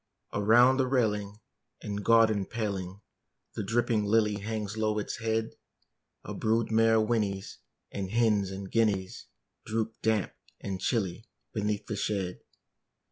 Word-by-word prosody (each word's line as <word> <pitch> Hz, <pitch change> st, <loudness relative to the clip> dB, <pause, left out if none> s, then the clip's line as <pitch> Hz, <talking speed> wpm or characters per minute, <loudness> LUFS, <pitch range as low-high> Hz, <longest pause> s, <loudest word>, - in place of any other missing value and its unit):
Around 120 Hz, +5 st, +5 dB
the 130 Hz, -1 st, +2 dB
railing 105 Hz, -5 st, 0 dB, 0.4 s
and 105 Hz, 0 st, -4 dB
garden 110 Hz, -3 st, +4 dB
paling 100 Hz, -4 st, -4 dB, 0.5 s
The -, -, -3 dB
dripping 110 Hz, +1 st, +1 dB
lily 105 Hz, 0 st, +2 dB
hangs 105 Hz, 0 st, -4 dB
low 110 Hz, -1 st, 0 dB
its 105 Hz, -, -3 dB
head: 110 Hz, 0 st, -1 dB, 0.7 s
A -, -, -6 dB
brood 110 Hz, +1 st, 0 dB
mare 110 Hz, 0 st, +4 dB
whinnies; 105 Hz, -3 st, -1 dB, 0.3 s
and 95 Hz, -2 st, -4 dB
hens 105 Hz, -3 st, +2 dB
and 95 Hz, 0 st, -7 dB
guineas 105 Hz, -5 st, 0 dB, 0.4 s
Droop, 110 Hz, 0 st, -2 dB
damp 110 Hz, -3 st, +1 dB, 0.3 s
and 95 Hz, -1 st, -5 dB
chilly, 105 Hz, -1 st, -1 dB, 0.3 s
beneath 105 Hz, -1 st, -1 dB
the 105 Hz, -, -4 dB
shed. 95 Hz, -3 st, -2 dB
105 Hz, 130 wpm, -29 LUFS, 100-115 Hz, 0.7 s, Around